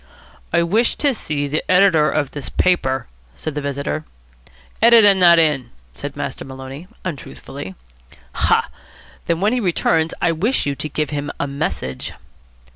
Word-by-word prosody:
"I 170 - +3
wish 215 +8 +2
to 285 -2 +2
see 145 -9 -3
the 150 +2 -1
editor 180 -5 +5
of 145 -3 -1
this 145 -2 -6
paper," 135 -8 +1 0.3
said 155 - -5
the 150 - -3
visitor. 140 +2 -3 0.8
"Editor 225 -3 +8
not 175 -3 +6
in," 150 -7 +2 0.2
said - - -6
Master - - -4
Maloney, 135 +5 -9 0.2
untruthfully. 95 - -7 0.6
"Ha! - - +1 0.6
Then 170 +1 0
when 210 +4 +2
he 250 - +1
returns 165 -5 +1
I 175 - +2
wish 205 +11 0
you 140 - 0
to 155 +2 -5
give 155 +1 -2
him 145 0 -3
a - - 0
message." 140 - -4
155 Hz, 150 wpm, -20 LUFS, 140-180 Hz, 0.8 s, Editor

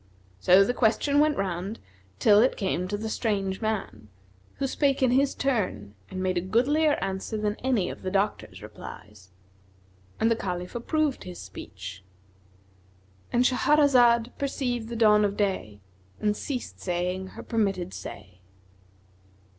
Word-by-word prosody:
So 185 - +6
the 245 - 0
question 265 +5 +2
went 300 -1 +3
round 190 +3 -3 0.4
till 205 - +5
it 255 - +2
came 185 -3 -1
to 205 +2 -2
the 220 +2 -4
strange 200 -3 -1
man, 195 - -3 0.5
who 275 - -2
spake 275 0 +1
in 255 - +4
his 275 +2 +2
turn 185 - -1 0.2
and 185 0 -4
made 185 -1 +1
a - - -4
goodlier 280 - +2
answer 190 +3 -3
than 210 0 -1
any 245 -8 0
of - - -7
the 185 - -3
doctors' 200 +2 -2
replies; 100 0 -11 0.9
and 225 - +3
the - - +4
Caliph 180 -4 -4
approved 295 +4 -1
his 180 -1 -8
speech.——And 95 - -8
Shahrazad 250 -3 +4
perceived 245 -4 -2
the 235 - -5
dawn 210 -2 +5
of 205 0 0
day 185 - -2 0.4
and 210 0 +1
ceased 255 +1 -5
saying 180 +1 -2
her - - -7
permitted 195 -6 -1
say. 90 0 -9
205 Hz, 140 wpm, -27 LUFS, 175-240 Hz, 0.9 s, So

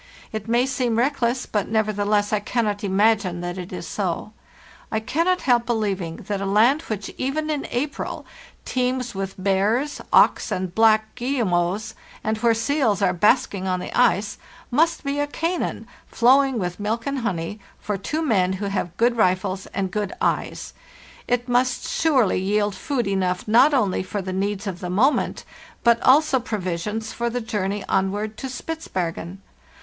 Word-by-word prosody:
It 220 -1 -5
may 240 +2 +3
seem 255 -4 0
reckless, 250 -1 +1
but 210 -3 -1
nevertheless 210 -1 +1
I 210 - +3
cannot 210 -1 -1
imagine 200 -2 +2
that 175 +1 -4
it 180 0 -7
is - - -6
so. - - -3 0.6
I 220 - +1
cannot 335 +11 0
help 240 -2 +2
believing 200 -8 -1
that 200 -2 -2
a - - -2
land 230 +9 +4
which 210 - -5
even 305 +4 -1
in 290 -2 -2
April 280 +4 -3 0.4
teems 250 -1 -1
with 195 0 -4
bears, 200 +9 0
auks, - - +4
and 185 -1 -2
black 220 0 +4
guille 250 0 -1
mots, 175 +3 0 0.3
and 220 - 0
where 230 0 +3
seals 225 -3 +1
are 180 -2 +3
basking 195 0 +2
on 185 -1 0
the - - -6
ice, 215 -4 +2 0.3
must 325 +5 +2
be 280 0 -2
a 290 - +1
Canaan, 335 +4 -2 0.3
'flowing 265 +2 +4
with 180 -3 -3
milk 220 +3 -2
and 280 -1 -1
honey,' 200 -3 -3 0.2
for 210 - -3
two 300 - -3
men 190 -10 +2
who 195 +2 -4
have 185 -3 -3
good 235 +1 +3
rifles 190 -2 +1
and 190 -2 -3
good 210 -1 -2
eyes; - - -1 0.5
it 245 0 0
must 245 0 +1
surely 265 - +2
yield 205 +2 +1
food 240 +6 -2
enough 185 -1 -1
not 240 +7 +6
only 230 -10 +1
for 195 +2 -4
the 185 0 -4
needs 195 +2 -2
of 185 -3 -4
the 180 -2 -5
moment, 235 +11 +1 0.4
but 235 -1 +4
also 275 0 +5
provisions 210 -1 -3
for 235 0 -1
the 245 +1 -2
journey 205 -3 -2
onward 205 +3 0
to 265 - -5
Spitzbergen. 190 - -4
215 Hz, 165 wpm, -23 LUFS, 195-250 Hz, 0.6 s, not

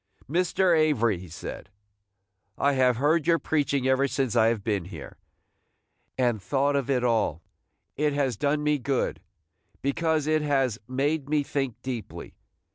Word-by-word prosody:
"Mr. 180 +3 +2
Avery," 120 - +2
he 90 -1 -11
said, 80 +4 -8 0.9
"I 140 0 +2
have 130 -3 +3
heard 150 +4 +2
your 170 -1 +5
preaching 140 -5 0
ever 130 +1 +3
since 130 -4 -1
I 110 -1 +5
have 115 -3 0
been 100 -5 -1
here, 85 -6 -10 1.0
and 120 -5 +1
thought 140 +9 +1
of 140 -1 -1
it 125 -3 +1
all. 110 -9 +1 0.5
It 150 0 +1
has 135 -4 0
done 145 +5 0
me 150 -1 +1
good, 130 +1 -1 0.6
because 155 +2 0
it 155 0 +2
has 135 -6 0
made 140 +3 -1
me 150 -1 +2
think 135 -4 -3
deeply. 125 -4 -6
135 Hz, 150 wpm, -26 LUFS, 120-150 Hz, 1.0 s, your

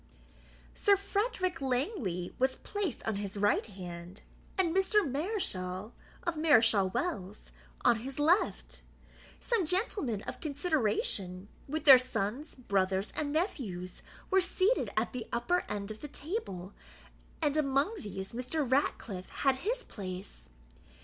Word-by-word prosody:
Sir 400 -1 +4
Frederick 395 - -1
Langley 250 - -1
was 260 0 +3
placed 405 -7 -3
on 220 -3 0
his 200 0 -4
right 205 +2 +2
hand, 180 -2 -8 0.3
and 355 -3 +2
Mr. 385 0 +4
Mareschal 235 - -2 0.3
of 345 -2 -1
Mareschal 225 -11 +5
Wells 205 - -3 0.3
on 240 -2 +6
his 260 +4 -7
left. 320 +7 +2 0.6
Some 465 -6 +1
gentlemen 310 - 0
of - - -7
consideration, 215 - 0 0.2
with 310 +2 -3
their 265 -3 +11
sons, 255 +3 -2
brothers, 195 -4 0
and 295 -1 -1
nephews, 225 - -2 0.3
were 380 0 +6
seated 375 +5 +2
at - - +1
the 250 -2 -5
upper 350 +10 +1
end 205 0 -3
of 215 - -9
the 295 - -5
table, 280 - -4 0.7
and 295 -2 +1
among 280 +5 +2
these 195 - -5
Mr. 255 +4 -1
Ratcliffe 225 -7 0
had 270 -2 +1
his 470 - -2
place. 185 - -7
260 Hz, 130 wpm, -32 LUFS, -, 0.7 s, their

